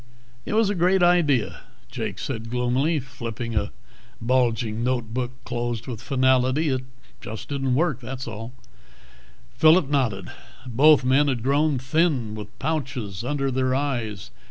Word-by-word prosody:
"It - - -2
was 220 -2 +3
a - - +1
great 180 +1 +3
idea," 165 -9 +3 0.3
Jake 110 -5 -4
said 115 -4 -5
gloomily, 125 +6 +1
flipping 120 -2 -6
a 105 - -1 0.5
bulging 115 -2 +1
notebook 125 0 -1
closed 120 -1 -3
with 120 -5 -6
finality. 130 +2 +2
"It 130 -2 0 0.4
just 110 0 -7
didn't 135 -3 0
work, 150 -4 +1
was 130 +1 -6
all." 115 +1 -6 1.0
Phillip 160 -1 +5
nodded. 120 -10 0 0.3
Both 135 +3 +5
men 135 +3 +4
had 125 -5 -1
grown 145 +2 +2
thin, 130 -4 +1
with 105 +1 -9
pouches 125 - -3
under 135 +1 -1
their 130 0 +1
eyes. 120 -8 -3
130 Hz, 135 wpm, -24 LUFS, 115-145 Hz, 1.0 s, Phillip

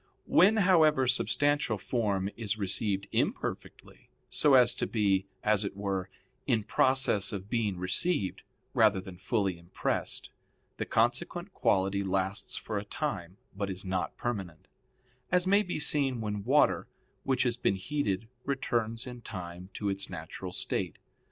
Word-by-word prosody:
When, 200 +6 +5
however, 160 -8 +5
substantial 145 -1 +2
form 100 -3 0
is 110 -2 -2
received 100 0 0
imperfectly, - - -3 0.2
so 145 -3 +4
as 125 -2 +6
to - - -2
be, 100 -3 +1 0.2
as 105 -1 +3
it 100 -1 -5
were, 95 -2 -2 0.4
in 115 -5 +2
process 110 -2 +2
of 100 0 -6
being 110 -6 0
received, 95 - 0 0.3
rather 105 -3 +4
than 95 -1 -10
fully 95 -4 0
impressed, 85 +1 -3 0.5
the - - -3
consequent 125 - 0
quality 95 +1 +1
lasts 95 +1 -1
for 105 -2 -3
a - - -6
time 100 - -4 0.2
but 100 0 -2
is 95 +1 -6
not 95 -1 -2
permanent; 95 -10 -4 0.6
as 180 0 +3
may 200 +2 +5
be 180 -6 -3
seen 140 -4 +1
when 105 -2 -3
water - - +3 0.3
which 130 -2 +1
has 120 -2 +1
been 120 -5 +1
heated 110 -1 -2 0.2
returns 115 -4 -1
in 125 -1 -8
time 90 -3 -7
to 105 - -2
its 95 0 -2
natural 80 -3 -7
state. - - -2
105 Hz, 145 wpm, -30 LUFS, 95-130 Hz, 0.6 s, as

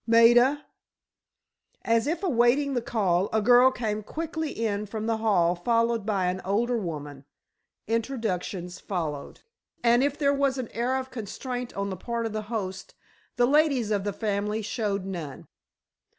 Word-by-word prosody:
Maida!" 240 +5 +5 1.2
As 230 +3 +2
if 335 +5 -2
awaiting 275 -2 +3
the 245 - 0
call, 195 -5 +1
a 220 - +2
girl 245 +4 +6
came 215 -4 -3
quickly 320 +6 -4
in 210 -4 -2
from 215 +1 -4
the 225 0 0
hall 190 -6 +2
followed 230 +3 +1
by 195 -4 +1
an 180 +1 -1
older 230 +5 0
woman. 145 -7 -6 0.6
Introductions 210 -6 -3
followed, 160 -7 -4 0.4
and 240 +2 +4
if 285 +1 0
there 285 -2 +2
was 275 -1 +1
an 255 -3 -4
air 245 +3 -1
of 260 0 -5
constraint 245 +2 -5
on 200 0 -2
the 190 - -5
part 235 +4 -3
of 225 - -3
the 215 - -2
host 190 -5 -4 0.4
the 245 - +4
ladies 275 -5 +3
of 200 -2 +1
the 205 - -1
family 210 +1 -2
showed 205 -3 -2
none. 170 -8 -6
225 Hz, 155 wpm, -27 LUFS, 200-245 Hz, 1.2 s, girl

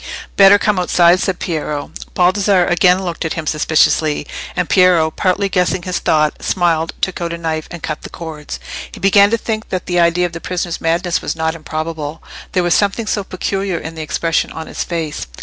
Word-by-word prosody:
"Better 195 0 +8
come 205 -2 +1
outside," 175 0 +4
said 185 -1 -1
Piero. 150 -3 -3 0.2
Baldassarre 185 0 +3
again 180 +1 +3
looked 175 -2 -4
at 160 - -2
him 165 - -4
suspiciously; 155 0 +2 0.3
and 180 -2 0
Piero, 180 -4 +4
partly 195 +3 0
guessing 180 -1 0
his 180 0 -2
thought, 155 -1 +1
smiled, 165 -3 0
took 190 -2 -2
out 170 0 -2
a - - -4
knife, 160 -2 -3
and 170 -2 -9
cut 155 - -4
the - - -9
cords. 155 -3 -7 0.3
He - - -10
began 200 +1 +5
to 230 - +1
think 220 -1 -4
that 185 -1 -3
the 175 -1 0
idea 170 +1 +3
of 175 - -4
the 170 - -7
prisoner's 175 -2 -3
madness 170 +1 0
was - - -3
not 160 0 -1
improbable, 155 -1 -5 0.3
there 180 - +2
was 175 - +2
something 205 +2 +1
so 210 -1 -1
peculiar 195 0 -2
in 160 0 -6
the 160 - -7
expression 165 +1 -1
of 160 - -6
his - - -4
face. 165 - -4
175 Hz, 200 wpm, -17 LUFS, 160-185 Hz, 0.3 s, Better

